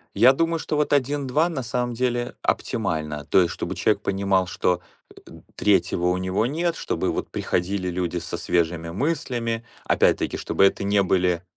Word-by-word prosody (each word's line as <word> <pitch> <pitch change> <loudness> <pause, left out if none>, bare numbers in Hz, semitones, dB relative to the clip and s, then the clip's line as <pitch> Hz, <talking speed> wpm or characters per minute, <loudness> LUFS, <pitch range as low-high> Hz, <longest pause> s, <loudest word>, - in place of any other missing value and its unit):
Я 130 +2 +7
думаю, 165 +3 +1
что 155 - -3
вот 150 0 +1
1-2 145 +3 +1
на 145 -6 -3
самом 125 0 -2
деле 120 0 -1
оптимально, 75 -2 -2
то 95 - +4
есть, 85 - +1
чтобы - - -4
человек - - +1
понимал, 95 -1 +1
что, 90 +1 0 0.3
э, - - -15 0.3
3 90 -3 +2
у 90 0 +2
него 95 +4 0
нет, 170 +4 -1
чтобы - - -2
вот - - -4
приходили 90 +1 -1
люди 90 0 -2
со 85 0 -4
свежими 85 -1 0
мыслями. 120 - -2 0.2
Опять-таки - - +2
чтобы - - +2
это 100 - +1
не 100 0 +3
были 90 -2 +1
100 Hz, 165 wpm, -24 LUFS, 90-130 Hz, 0.3 s, Я